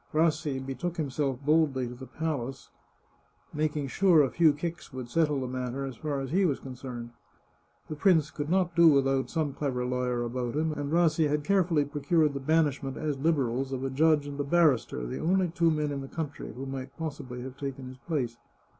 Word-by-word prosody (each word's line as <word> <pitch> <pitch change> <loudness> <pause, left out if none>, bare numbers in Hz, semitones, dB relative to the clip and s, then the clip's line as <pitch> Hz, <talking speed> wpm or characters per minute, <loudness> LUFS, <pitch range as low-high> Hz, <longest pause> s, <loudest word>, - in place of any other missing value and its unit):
Rassi 155 -3 +2
betook 135 +7 -4
himself 140 -3 -2
boldly 150 -5 +2
to 120 - -7
the 130 +1 -10
palace, 135 -5 -4 0.8
making 150 -2 -1
sure 170 +1 +5
a 135 - 0
few 165 -2 +5
kicks 165 +4 -5
would 130 -2 -6
settle 150 0 +2
the - - -2
matter 130 +1 -3
as 135 -2 -6
far 145 +2 -3
as 135 -1 -5
he 190 +4 +3
was 150 -7 +1
concerned. 125 -2 -7 0.8
The 155 - -5
prince 160 -2 +3
could 150 0 -4
not 180 -2 +1
do 170 -1 +7
without 135 -3 +3
some 155 -4 -1
clever 130 -4 -2
lawyer 125 -1 -1
about 120 +1 -3
him, 155 +1 +1
and 145 -1 -4
Rassi 160 -2 +3
had 150 0 0
carefully 175 -4 +2
procured 145 +1 +1
the 140 - -3
banishment, 145 -2 +1
as 150 -3 -2
Liberals, 135 -4 0
of 130 -1 -3
a 135 - -2
judge 150 +1 +3
and 145 0 -7
a - - +1
barrister, 140 - +2
the - - -4
only 185 +2 +2
two 170 0 +2
men 150 -2 0
in 140 -1 -3
the 135 - -7
country 150 -1 -5
who 130 +2 -7
might 135 0 -6
possibly 140 -6 -5
have 130 0 -7
taken 135 -1 -5
his 130 0 -10
place. 125 -8 -2
145 Hz, 200 wpm, -28 LUFS, 130-160 Hz, 0.8 s, do